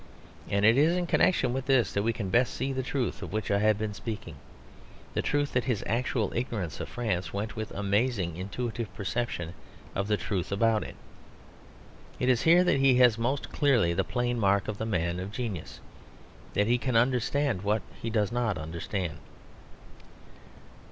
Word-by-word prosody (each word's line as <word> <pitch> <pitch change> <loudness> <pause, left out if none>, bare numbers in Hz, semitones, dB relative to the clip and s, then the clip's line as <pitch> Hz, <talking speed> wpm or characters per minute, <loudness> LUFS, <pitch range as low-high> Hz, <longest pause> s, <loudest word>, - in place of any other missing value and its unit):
And 100 +1 +2
it 115 +5 +6
is 165 +4 +4
in 180 - 0
connection 175 -7 +2
with 130 0 -3
this 130 -4 +3
that 100 - +1
we 115 +3 +1
can 105 -4 -4
best 125 +4 +2
see 135 +1 -2
the 130 - -1
truth 125 -6 -2
of - - -6
which 110 -1 -2
I 100 - +3
have 105 0 +3
been 105 -1 -3
speaking; 105 -5 -6 0.8
the - - 0
truth 145 -1 0
that 125 -2 +1
his 120 -5 -1
actual 115 -2 0
ignorance 110 - -3
of - - -5
France 110 -7 -2
went 105 +2 -3
with 110 -2 -4
amazing 100 -3 0
intuitive 110 +3 -4
perception 100 -5 -3 0.4
of 100 +1 -1
the 105 -1 +2
truth 95 -4 -3
about 110 +2 +2
it. - - -9 1.2
It 125 - +1
is 125 -2 +3
here 170 +2 +6
that 180 -6 +2
he 135 -1 +5
has 125 -3 +5
most 130 +4 -1
clearly 125 - +3
the - - +1
plain 120 -1 -1
mark 100 -1 +2
of 105 -1 -4
the 110 - -2
man 85 -4 -1
of 95 +2 -5
genius; 110 -7 -5 0.8
that 105 - +3
he 120 +3 +2
can 125 -1 -1
understand 125 -1 +2
what 105 +2 0 0.2
he 115 - -2
does 110 -2 +1
not 120 -5 0
understand. 85 +2 -4
110 Hz, 180 wpm, -28 LUFS, 100-125 Hz, 1.2 s, it